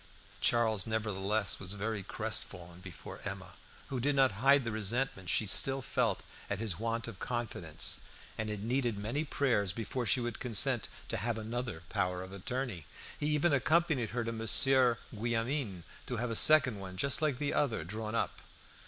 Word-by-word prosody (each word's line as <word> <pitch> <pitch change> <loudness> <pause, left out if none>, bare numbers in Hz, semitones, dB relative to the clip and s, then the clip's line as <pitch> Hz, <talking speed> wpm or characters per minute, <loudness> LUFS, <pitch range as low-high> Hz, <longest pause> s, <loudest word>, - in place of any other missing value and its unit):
Charles 110 -4 +3
nevertheless 105 -2 0
was 95 0 +1
very 105 +1 -2
crestfallen 90 -1 -3
before 90 -2 -9
Emma, 95 -2 -5 0.4
who 135 -3 -2
did 140 +4 +1
not 135 -3 +5
hide 140 +1 +6
the 115 - -2
resentment 110 -2 -1
she 110 - +3
still 135 +7 +3
felt - - 0 0.3
at 100 - -1
his 100 -4 -1
want 115 +1 -2
of 105 -5 -8
confidence, 115 -10 -1 0.4
and 110 -1 -3
it 105 -1 -3
needed 120 -2 0
many 115 +9 -1
prayers 125 - +1
before 115 +4 -3
she 130 - +4
would 120 -2 -3
consent 115 -6 +2 0.2
to - - -1
have 115 +2 -1
another 110 -5 -4
power 90 -2 -1
of 95 +1 -10
attorney. 100 - -4 0.3
He 150 - -1
even 150 +1 +3
accompanied 150 -3 +2
her 120 +1 -2
to 115 - -2
Monsieur 120 +3 +4 0.2
Guillaumin 115 - -1 0.2
to 125 - -2
have 120 +1 -2
a - - -2
second 145 -6 +5
one, 95 -1 -8
just 140 - +2
like 150 -5 +1
the 145 +1 -1
other, 120 - +1
drawn 110 +5 -4
up. - - -1
115 Hz, 170 wpm, -32 LUFS, 100-130 Hz, 0.4 s, hide